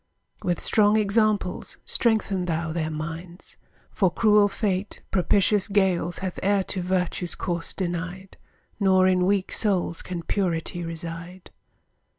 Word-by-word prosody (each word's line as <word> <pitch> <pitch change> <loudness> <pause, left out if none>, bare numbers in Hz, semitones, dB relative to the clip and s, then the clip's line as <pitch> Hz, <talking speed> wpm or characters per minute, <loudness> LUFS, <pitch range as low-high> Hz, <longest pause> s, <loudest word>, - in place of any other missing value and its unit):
With 175 -1 -1
strong 210 0 +3
examples 210 -3 0
strengthen 215 -5 +1
thou 165 -1 -2
their 160 -2 -1
minds; 165 +3 -7 0.4
For 195 -4 +2
cruel 210 +2 +4
fate 200 -1 -2
propitious 195 +2 +3
gales 190 -4 +1
Hath 185 - -4
e'er 200 0 +2
to 190 - -1
virtue's 180 -1 -1
course 170 -2 -3
denied, 185 +1 -4 0.4
Nor 190 -2 +4
in 185 -1 +3
weak 195 -1 +1
souls 190 -5 0
can 175 -2 -5
purity 175 -2 -2
reside. 170 +2 -7
185 Hz, 125 wpm, -25 LUFS, 175-200 Hz, 0.4 s, cruel